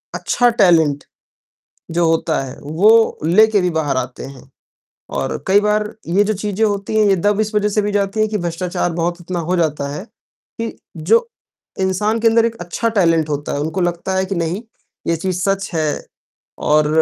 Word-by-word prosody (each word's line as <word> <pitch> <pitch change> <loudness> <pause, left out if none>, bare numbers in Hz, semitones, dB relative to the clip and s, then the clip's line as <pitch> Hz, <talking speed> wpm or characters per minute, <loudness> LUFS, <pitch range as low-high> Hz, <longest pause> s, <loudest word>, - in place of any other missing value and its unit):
अच्छा 245 -1 +2
टैलेंट 165 - +3 0.9
जो 170 +1 +1
होता 160 -1 +1
है, 130 - -8
वो 210 +10 +3
लेकर 210 +4 +4
भी 180 - +1
बाहर 155 -5 -1
आते 130 0 -4
हैं 135 0 -12 0.7
और - - -3
कई 195 +2 +5
बार 210 0 0
ये 185 +5 +3
जो 215 +1 0
चीज़ें 210 +2 -1
होती 205 0 -2
हैं, 210 - +4
ये 195 - +4
दब 205 +3 +1
इस 215 0 -3
वजह 210 0 +2
से 210 +1 +1
भी 205 0 -1
जाती 200 +1 -1
है 215 - +3
कि 215 - -2
भ्रष्टाचार 175 0 -2
बहुत 170 +1 -1
इतना 175 0 -4
हो 175 +3 -1
जाता 150 -4 0
है 150 - -6
कि 230 -1 -10 0.2
जो, 215 - +2 0.5
इंसान 210 +4 0
के 230 - +3
अंदर 225 0 +4
एक 230 0 -2
अच्छा 200 +6 -2
टैलेंट 165 -3 +2
होता 145 0 -3
है, - - -2
उनको 160 +5 -2
लगता 175 +2 -1
है 190 0 +1
कि 195 0 -4
नहीं 170 +5 -2 0.5
ये 170 - +2
चीज़ 180 +2 -2
सच 195 0 0
है 155 -2 -1 0.6
और 150 0 +4
185 Hz, 190 wpm, -18 LUFS, 165-210 Hz, 0.9 s, कई